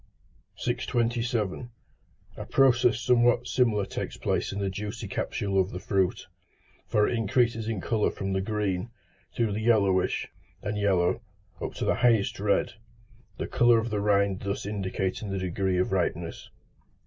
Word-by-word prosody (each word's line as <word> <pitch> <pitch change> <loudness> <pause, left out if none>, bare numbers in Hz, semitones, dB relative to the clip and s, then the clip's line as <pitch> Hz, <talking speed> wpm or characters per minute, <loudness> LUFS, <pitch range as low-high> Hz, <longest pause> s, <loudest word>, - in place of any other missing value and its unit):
627. 120 -2 -1 0.7
A - - -7
process 120 -3 +4
somewhat 120 0 +3
similar 115 -6 +2
takes - - -5
place - - -1
in 100 - -5
the 100 -1 -1
juicy 105 +3 -5
capsule 100 0 0
of 95 - -2
the 90 - -6
fruit, 95 -3 0 0.6
for 105 -1 +3
it - - 0
increases 115 0 +1
in 115 -3 -2
colour 110 -3 +1
from 95 0 -4
the 95 - 0
green, 100 -1 -2 0.5
through 115 -3 +1
the 105 +2 -2
yellowish 100 -5 +2 0.4
and 105 - -2
yellow, 100 -1 +2 0.4
up - - -4
to - - -3
the - - +3
highest 115 -6 +2
red, 105 +3 +1 0.6
the - - -3
colour 120 -1 +4
of 115 0 -1
the 105 -1 0
rind 100 -2 +2
thus 100 0 -3
indicating 100 0 -3
the 95 - -2
degree 95 0 -1
of 90 - +1
ripeness. 85 -3 -2
105 Hz, 150 wpm, -27 LUFS, 95-115 Hz, 0.7 s, process